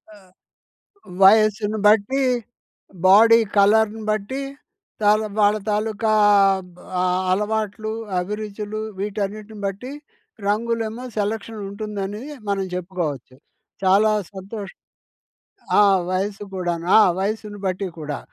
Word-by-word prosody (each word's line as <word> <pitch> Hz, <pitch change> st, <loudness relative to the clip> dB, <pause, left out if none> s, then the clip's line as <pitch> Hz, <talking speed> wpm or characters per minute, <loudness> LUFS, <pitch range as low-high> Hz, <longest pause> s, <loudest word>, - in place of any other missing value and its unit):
ఆ! -, -, -16 dB, 1.0 s
వయసును 215 Hz, +1 st, +4 dB
బట్టీ, 220 Hz, +6 st, +3 dB, 0.8 s
బాడీ 225 Hz, +4 st, +7 dB, 0.2 s
కలర్‌ను 220 Hz, +2 st, +3 dB
బట్టి, 215 Hz, +6 st, -3 dB, 0.6 s
తాల 210 Hz, +1 st, +4 dB, 0.2 s
వాళ్ళ 205 Hz, 0 st, +4 dB
తాలూకా 215 Hz, +1 st, 0 dB, 0.6 s
బ్ -, -, -19 dB, 0.2 s
ఆహ్, 180 Hz, 0 st, +1 dB
అలవాట్లు, 215 Hz, +1 st, -1 dB, 0.3 s
అభిరుచులు 210 Hz, +2 st, -5 dB, 0.2 s
వీటన్నిటిని 210 Hz, +1 st, -4 dB
బట్టి 200 Hz, +7 st, -5 dB, 0.6 s
రంగులేమో 225 Hz, +2 st, -1 dB
సెలక్షనుంటుందనీ 210 Hz, 0 st, -4 dB, 0.2 s
మనం 200 Hz, -1 st, 0 dB
జెప్పుకోవచ్చు. 170 Hz, -8 st, -4 dB, 0.5 s
చాలా 200 Hz, +3 st, +4 dB, 0.2 s
సంతోషం 195 Hz, +1 st, -8 dB, 1.0 s
ఆ! -, -, +7 dB, 0.3 s
వయస్సు 195 Hz, +2 st, -2 dB
కూడాను. 175 Hz, -2 st, -3 dB
ఆ! -, -, +8 dB, 0.2 s
వయస్సును 205 Hz, +1 st, -3 dB
బట్టి 185 Hz, +1 st, -2 dB
కూడా. 150 Hz, -2 st, -4 dB
210 Hz, 90 wpm, -22 LUFS, 195-215 Hz, 1.0 s, ఆ